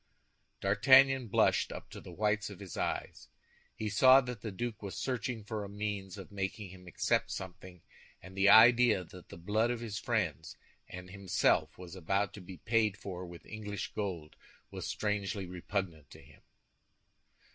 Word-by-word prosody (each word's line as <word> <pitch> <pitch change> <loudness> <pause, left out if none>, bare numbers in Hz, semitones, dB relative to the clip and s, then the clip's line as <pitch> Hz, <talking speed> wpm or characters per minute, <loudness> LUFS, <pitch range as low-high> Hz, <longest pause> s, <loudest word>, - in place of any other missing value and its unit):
D'Artagnan 130 +6 +5
blushed 100 - +2
up - - -9
to - - -9
the - - -11
whites 105 +1 0
of 100 - -10
his 95 -4 -9
eyes. - - -3 0.5
He 110 - -4
saw 130 +6 +7
that 125 -4 -7
the 110 - -5
duke 115 +2 -5
was 100 -2 -6
searching 120 -3 -3
for 105 0 -4
a 100 - -7
means 100 -2 -4
of 95 - -10
making 100 -1 -4
him 90 -1 -14
accept 90 - 0
something 95 -1 -8 0.4
and 95 +1 -13
the 100 +1 +4
idea 115 -2 +7
that 90 +1 -14
the - - -10
blood 105 +7 0
of 120 -1 -2
his 110 -2 -5
friends 100 -10 -2 0.3
and 90 0 -9
himself 100 -1 +1
was 90 0 -10
about 95 +3 -1
to 105 - -9
be 90 0 -10
paid 110 +2 +1
for 90 -2 -7
with 85 0 -12
English 105 -1 -6
gold 90 -7 -4 0.4
was - - -6
strangely 100 -2 -2
repugnant 90 -4 -4
to - - -14
him. - - -19
100 Hz, 170 wpm, -32 LUFS, 95-110 Hz, 0.5 s, saw